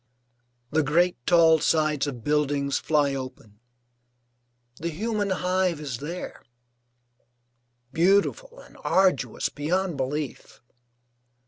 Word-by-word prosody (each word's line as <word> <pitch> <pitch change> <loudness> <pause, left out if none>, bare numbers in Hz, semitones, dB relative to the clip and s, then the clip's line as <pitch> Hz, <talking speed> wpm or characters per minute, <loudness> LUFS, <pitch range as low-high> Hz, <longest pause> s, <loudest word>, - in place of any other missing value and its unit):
The 155 - +2
great 170 +5 +2
tall 165 -2 +5
sides 155 -2 +1
of 125 -5 -6
buildings 145 -1 0
fly 145 -3 +1
open, 130 -6 -8 1.2
the 170 - -3
human 205 +4 -2
hive 185 -2 0
is 135 -6 -5
there, 170 +5 -7 1.5
beautiful 200 - +1
and - - -17
arduous 190 -1 +1
beyond 175 +3 -2
belief. 140 +1 -4
155 Hz, 95 wpm, -25 LUFS, 145-180 Hz, 1.5 s, tall